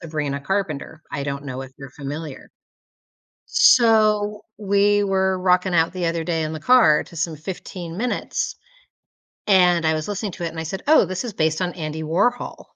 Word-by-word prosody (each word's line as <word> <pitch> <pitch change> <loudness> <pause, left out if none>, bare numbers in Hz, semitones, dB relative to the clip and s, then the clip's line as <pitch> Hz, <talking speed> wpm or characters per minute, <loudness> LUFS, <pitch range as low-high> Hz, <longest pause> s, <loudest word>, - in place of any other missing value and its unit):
Sabrina 150 -4 -3
Carpenter. 160 -3 -3
I 140 0 -3
don't 140 0 -4
know 130 -1 -5
if 130 - -11
you're 135 -2 -10
familiar. 145 +1 -7 1.0
So, 215 -3 +4 0.2
we 205 0 +2
were 190 -1 +1
rocking 180 0 +2
out 165 0 +3
the 180 -2 -2
other 165 -1 -1
day 165 -2 -1
in 155 +1 -3
the 155 - -5
car 230 -7 +5
to 170 - -15
some 160 0 -2
15 175 +1 -7
minutes, 245 +4 -2 0.9
and 180 -4 +4
I 160 - +3
was 155 +3 -3
listening 205 -1 -3
to 175 - -7
it - - -2
and 160 - -8
I - - -3
said, 190 +5 -5
"Oh, 310 -6 +6
this 185 +6 -4
is 225 - -5
based 160 0 0
on 180 -1 -1
Andy 160 -2 -5
Warhol." 180 +11 -1
170 Hz, 185 wpm, -22 LUFS, 155-200 Hz, 1.0 s, Oh